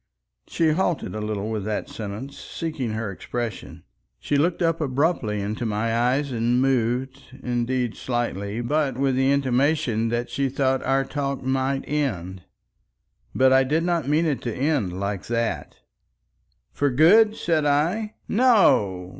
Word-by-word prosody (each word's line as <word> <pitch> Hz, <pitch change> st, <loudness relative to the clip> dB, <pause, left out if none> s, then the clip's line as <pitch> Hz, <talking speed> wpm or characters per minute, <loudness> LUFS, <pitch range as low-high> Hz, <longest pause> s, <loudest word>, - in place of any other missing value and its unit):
She 165 Hz, -1 st, +1 dB
halted 170 Hz, -1 st, -1 dB
a 110 Hz, -, -4 dB
little 105 Hz, 0 st, -3 dB
with 110 Hz, -3 st, -2 dB
that 105 Hz, -1 st, -2 dB
sentence, 110 Hz, +6 st, -7 dB
seeking 150 Hz, -9 st, -4 dB
her 110 Hz, -2 st, -3 dB
expression. 115 Hz, +3 st, -6 dB, 0.3 s
She 145 Hz, -, -2 dB
looked 170 Hz, +5 st, +1 dB
up 165 Hz, 0 st, +1 dB
abruptly 135 Hz, -6 st, 0 dB
into 105 Hz, +4 st, -3 dB
my 115 Hz, +1 st, -1 dB
eyes 130 Hz, +4 st, +1 dB
and 120 Hz, +1 st, +1 dB
moved, 130 Hz, +1 st, 0 dB, 0.2 s
indeed 125 Hz, -1 st, -1 dB
slightly, 115 Hz, -3 st, -3 dB
but 140 Hz, 0 st, 0 dB
with 135 Hz, -1 st, +1 dB
the 135 Hz, +1 st, +2 dB
intimation 130 Hz, -4 st, +1 dB
that 120 Hz, +1 st, -2 dB
she 140 Hz, -1 st, 0 dB
thought 135 Hz, 0 st, 0 dB
our 135 Hz, 0 st, +1 dB
talk 140 Hz, -1 st, -3 dB
might 135 Hz, +1 st, -1 dB
end. 95 Hz, -, -2 dB, 0.9 s
But 130 Hz, 0 st, +5 dB
I 135 Hz, 0 st, +5 dB
did 155 Hz, +5 st, 0 dB
not 170 Hz, -5 st, 0 dB
mean 155 Hz, +3 st, +2 dB
it 150 Hz, -4 st, -1 dB
to 120 Hz, -, -3 dB
end 125 Hz, -, -1 dB
like 100 Hz, -1 st, -3 dB
that. 115 Hz, -1 st, -2 dB, 1.0 s
"For 145 Hz, -, 0 dB
good?" 205 Hz, -, +5 dB
said 160 Hz, -6 st, 0 dB
I. 175 Hz, +10 st, 0 dB
"No! 170 Hz, -, +3 dB
130 Hz, 145 wpm, -24 LUFS, 115-145 Hz, 1.0 s, But